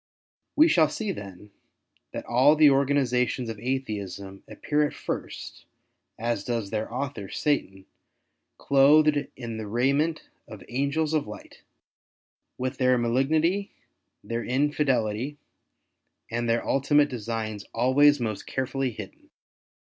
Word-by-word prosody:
We 310 +2 +6
shall 160 - +4
see 210 +6 -3
then, 100 - -9 0.6
that - - -6
all 130 +5 +4
the 150 -2 +6
organizations 130 -3 +1
of 110 -2 -6
Atheism 100 -6 -4
appear 150 0 0
at - - -10
first - - -6 0.5
as 115 -2 -2
does 115 -4 -3
their 110 0 -3
author, 125 -6 -4
Satan, 95 -10 -1 0.7
clothed 145 +1 +4
in 115 -3 -6
the 110 -1 -5
raiment 140 +8 0 0.2
of - - -10
angels 140 +5 -1
of 150 -7 0
light, 105 - -11 1.0
with 130 +1 -3
their 130 -1 +4
malignity, 155 +11 +1 0.5
their 115 0 -3
Infidelity, 130 -2 0 0.9
and 120 0 -1
their 115 0 +1
ultimate 145 +2 +3
designs 110 -3 -4
always 140 +5 +4
most 110 -4 -4
carefully 130 0 -2
hidden. 105 -4 -10
130 Hz, 115 wpm, -26 LUFS, 115-145 Hz, 1.0 s, We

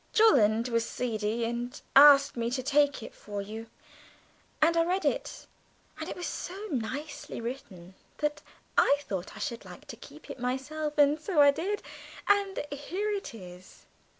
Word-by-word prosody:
Jolland 235 - +4
was 230 -1 0
seedy 225 -1 -2
and 240 +3 -4 0.2
asked 280 0 +8
me 235 -1 -1
to 255 +1 -2
take 285 -2 +2
it - - -9
for 205 -1 -7
you, 220 +3 -7 0.9
and 330 +2 +4
I 335 - +4
read 365 +3 -1
it, - - -2 0.5
and - - -5
it - - -5
was 355 - -5
so 355 +5 -5
nicely 280 +4 -4
written 230 -8 -7 0.2
that 300 0 -2 0.4
I 285 - +5
thought 190 -8 -5
I - - -10
should 230 +2 -4
like - - -12
to - - -6
keep - - -14
it - - -9
myself, 295 +5 -3
and 295 +1 +4
so 340 -1 -1
I 285 -1 +8
did 390 +8 -3 0.4
and 400 -4 +2
here 365 +9 -3
it 400 - -4
is!" 180 -2 -13
275 Hz, 165 wpm, -29 LUFS, 230-310 Hz, 0.9 s, asked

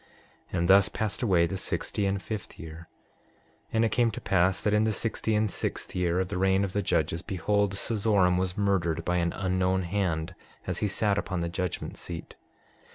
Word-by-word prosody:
And 85 0 0
thus 100 +2 +6
passed 110 -1 -3
away 90 -8 +4
the 95 +3 -3
sixty 100 +1 -2
and 95 0 0
fifth 105 +1 -6
year. 80 +1 -9 0.8
6:15 - - -28
And 115 0 +3
it 110 - 0
came 120 0 +3
to 110 - -5
pass 95 -1 +2
that 105 - +2
in 105 +1 +4
the 110 0 +1
sixty 110 +1 -1
and 105 +1 +2
sixth - - -3
year 90 -1 +1
of 95 -1 -1
the 90 - -2
reign 95 +1 +3
of 95 -2 -3
the 100 - +1
judges, 85 -3 0
behold, 100 +2 0
Cezoram 100 -4 +2
was 95 0 -2
murdered 85 -5 +1
by 90 0 +1
an 85 -1 +1
unknown 95 0 0
hand 85 -2 -1 0.3
as - - -2
he 105 - +1
sat 100 +1 +1
upon 90 -4 -3
the 85 - -1
judgment 90 0 -3
seat. 85 -2 -7
95 Hz, 200 wpm, -28 LUFS, 90-105 Hz, 0.8 s, thus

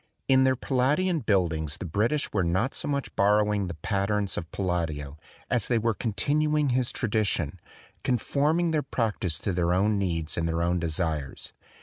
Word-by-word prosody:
In 130 0 +5
their 130 0 +3
Palladian 145 +8 +1
buildings 85 - 0
the - - -6
British 110 - 0
were 95 - +2
not 95 +10 0
so - - -3
much 140 -1 -2
borrow 105 +1 +3
ing 100 -2 -1
the 85 - -5
patterns 100 +4 -1
of 80 - -5
Palladio 80 -6 -2 0.3
as 120 -4 0
they 120 - +2
were 115 0 +1
con 110 +1 -3
tinuing 150 +5 +1
his 125 -1 +1
tradition, 105 - -1 0.4
conforming 150 +7 +1
their 155 -2 +1
practise 105 - -1
to 95 - -2
their 90 0 +1
own 105 +2 +2
needs 85 -4 -1
and 85 - 0
their 85 +1 0
own 90 +1 +1
desires. 80 -4 -2
105 Hz, 175 wpm, -27 LUFS, 85-130 Hz, 0.4 s, In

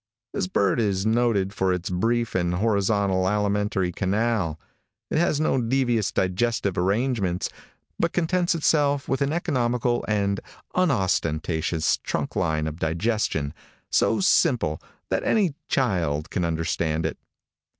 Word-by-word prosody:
This - - -1
bird 100 +4 +1
is 100 -3 0
noted 110 -4 +2
for 95 -2 +1
its 90 0 -2
brief 115 +5 0
and 90 -1 0
horizontal 100 -2 +1
alimentary 105 -2 0
canal. 95 -4 0 0.5
It - - +2
has 160 -3 +2
no 145 -4 +1
devious 120 -3 +1
digestive 100 +1 0
arrangements, 100 -1 0 0.5
but - - +1
contents 175 0 +1
itself 145 -3 +2
with 135 - -1
an 140 +1 +1
economical 125 -7 0
and 100 -2 0 0.3
unostentatious 85 - +1
trunk - - -3
line 80 -1 0
of 80 +1 -5
digestion 80 -3 -1 0.4
so 115 - +3
simple 125 - +2 0.3
that - - 0
any 195 -9 +2
child 85 - 0
can 90 - 0
understand 80 -1 -1
it. 80 - -3
100 Hz, 125 wpm, -25 LUFS, 90-120 Hz, 0.5 s, so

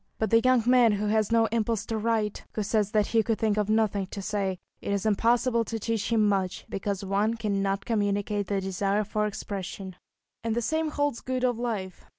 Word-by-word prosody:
But 220 -2 -1
the 230 - +7
young 255 -1 +3
man 245 -3 +5
who 205 +1 -1
has 215 0 +1
no 230 -1 +4
impulse 225 -2 0
to 225 - -3
write, 215 -2 -1
who 215 - -1
says 210 0 +1
that 210 -1 +2
he 225 +1 +2
could 220 0 0
think 215 -2 +1
of 210 -1 0
nothing 215 -3 +1
to 200 - -7
say, 195 -1 -2 0.2
it - - -3
is 200 0 -1
impossible 235 +3 +2
to 225 - -3
teach 225 0 -2
him 220 -2 +4
much, 190 -3 -1
because 195 0 -3
one 205 +4 +1
cannot 200 -3 -1
communicate 205 -2 0
the 200 -1 0
desire 195 +2 0
for 210 +1 -1
expression. 195 -2 -6 0.5
And 225 -1 -1
the 240 - 0
same 315 +6 0
holds 290 -4 -1
good 255 0 -2
of 245 -2 +1
life. 210 -7 -4
215 Hz, 205 wpm, -27 LUFS, 200-230 Hz, 0.5 s, the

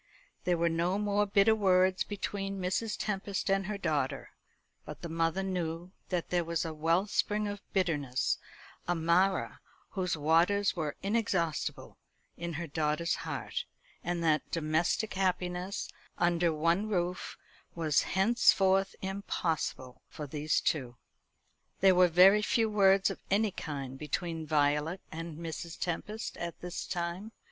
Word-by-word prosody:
There 180 -1 +2
were 170 0 +2
no 170 +3 +1
more 205 0 +1
bitter 200 +2 +5
words 185 -3 +3
between 195 -1 -4
Mrs. 190 +4 -1
Tempest 195 -1 -2
and 195 -1 +1
her 210 -1 -3
daughter, 155 -8 -1 0.5
but - - -10
the 170 - -4
mother 165 +3 0
knew 175 -2 -3 0.2
that 180 -3 -2
there 175 -1 +2
was 170 0 -2
a 160 - -4
wellspring 190 +6 +1
of 205 0 -5
bitterness 145 -9 0 0.5
a 175 - +1
Marah 175 +4 +2 0.3
whose 180 -4 -1
waters 170 +7 +3
were 155 -4 -2
inexhaustible 195 -6 -1 0.4
in 170 0 -5
her 170 +3 -3
daughter's 155 +2 0
heart; - - -4 0.4
and 175 0 -2
that 155 -2 +2
domestic 165 +6 0
happiness, 185 0 -1 0.3
under 175 -1 +2
one 170 +7 +1
roof, 180 -2 -2 0.4
was 155 -4 +2
henceforth 195 -1 +3
impossible 165 -9 -3
for 150 - -7
these 150 +2 0
two. 125 -6 -1 0.8
There 190 0 +6
were 180 0 +6
very 185 +5 +7
few 225 0 +1
words 195 -2 +4
of - - -7
any 205 +1 +2
kind 135 -6 -6
between 160 +1 -3
Violet 150 +3 +1
and 165 -1 -6
Mrs. 165 0 -6
Tempest 210 +5 -4
at 170 -1 -5
this 180 0 -5
time. 180 +4 -4
175 Hz, 135 wpm, -31 LUFS, 165-195 Hz, 0.8 s, very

